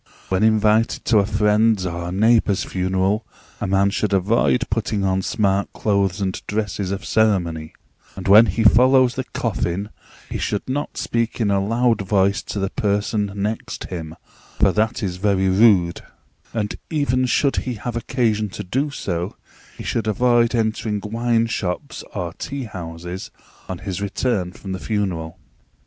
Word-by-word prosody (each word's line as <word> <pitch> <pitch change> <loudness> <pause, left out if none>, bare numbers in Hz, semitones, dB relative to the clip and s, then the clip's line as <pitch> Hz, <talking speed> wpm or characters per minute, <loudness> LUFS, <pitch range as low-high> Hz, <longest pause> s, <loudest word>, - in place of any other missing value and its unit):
When 95 0 +1
invited 110 0 +3
to 110 - +4
a 100 - +1
friend's 105 -1 +2
or 85 0 -4
neighbour's 105 0 +3
funeral, 95 +3 0 0.4
a 105 - -2
man 100 +1 +2
should 105 0 -1
avoid 115 +5 +2
putting 105 -2 -1
on 95 0 +1
smart 100 -1 0
clothes 100 -2 0
and 95 -2 -2
dresses 105 -2 -2
of 100 +3 -4
ceremony; 85 -8 +1 0.4
and 95 - -6
when 105 +4 +8
he 105 +5 0
follows 125 +3 +5
the 130 0 -4
coffin, 100 -5 -2 0.4
he - - -4
should 105 - -2
not 140 +3 -3
speak 115 0 -1
in 105 -3 +1
a 100 -1 +2
loud 115 +1 +2
voice 100 0 +2
to - - -6
the 95 0 -1
person 105 0 0
next 105 +2 -3
him, 80 -3 -6 0.4
for - - +4
that 110 +2 0
is 90 -2 -2
very 95 -1 +2
rude; 95 -4 +4 0.5
and 105 -3 -3
even 130 -4 +1
should 140 +2 +2
he 125 -2 -2
have 115 +3 -5
occasion 115 -3 0
to 105 - -6
do 130 +10 -1
so, 90 -8 -3 0.4
he - - -7
should 115 -1 -2
avoid 120 +2 +3
entering 110 -2 -1
wine 115 +1 +1
shops 95 -6 -3
or 85 -2 -3
tea 140 +8 -5
houses 90 -3 -7 0.4
on 95 - -3
his 95 +1 -5
return 100 -2 -1
from 95 +1 -9
the 95 - -3
funeral. 95 -6 -2
105 Hz, 160 wpm, -21 LUFS, 95-115 Hz, 0.5 s, when